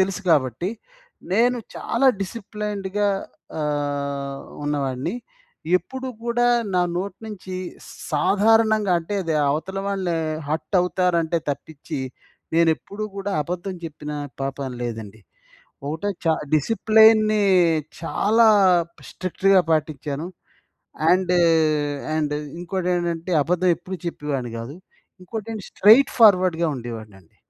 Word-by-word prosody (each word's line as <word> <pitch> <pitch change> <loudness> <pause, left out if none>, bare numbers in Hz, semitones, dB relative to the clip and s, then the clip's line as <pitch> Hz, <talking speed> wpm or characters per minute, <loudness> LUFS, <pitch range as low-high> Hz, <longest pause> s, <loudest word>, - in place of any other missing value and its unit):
తెలుసు 190 +1 0
కాబట్టి. 140 - +2 0.6
నేను 240 +4 +3 0.2
చాలా 265 +4 0
డిసిప్లేన్డ్‌గా 205 -1 -3 0.5
ఆహ్, 140 -2 -2 0.3
ఉన్నవాడిని. 140 - -2 0.6
ఎప్పుడు 260 +8 -7 0.2
కూడా 240 +1 +1 0.3
నా 180 - +4 0.2
నోటి 190 +1 -4
నుంచి 195 -3 -7 0.3
స్ - - -12 0.2
సాధారణంగా 215 +4 +3
అంటే, 170 +5 -5
అది 165 -3 -1 0.2
అవతల 185 +7 -3
వాళ్ళు 190 -3 -1 0.3
హర్ట్ 155 +6 -3
అవుతారంటే 175 -2 +1
తప్పించి, 150 +2 -6 0.6
నేనెప్పుడూ 170 +5 +1
కూడా 200 0 -3
అబద్ధం 180 +4 -4
చెప్పిన 150 -2 -7 0.3
పాపాన 135 0 -3
లేదండి. 110 -3 -6 0.7
ఒకటే 160 +7 -3 0.2
చ - - -5 0.3
డిసిప్లేన్‌ని 215 +4 +4 0.6
చాలా 220 +7 +3 0.6
స్ట్రిక్ట్‌గా 190 +1 +2
పాటించాను. 155 -1 -1 0.9
అండ్, 180 0 +2 0.8
అండ్ 150 -2 0 0.3
ఇంకోటేంటంటే, 175 -1 -2
అబద్ధం 180 +2 +1
ఎప్పుడు 185 +1 -7
చెప్పేవాడిని 140 -7 -3
కాదు. 120 +6 -7 0.5
ఇంకోటేంటి 220 +2 -6
స్ట్రెయిట్ 225 +8 +6
ఫార్వర్డ్‌గా 185 -7 +5
ఉండేవాడినండి. 110 -7 -9
180 Hz, 95 wpm, -23 LUFS, 150-205 Hz, 0.9 s, స్ట్రెయిట్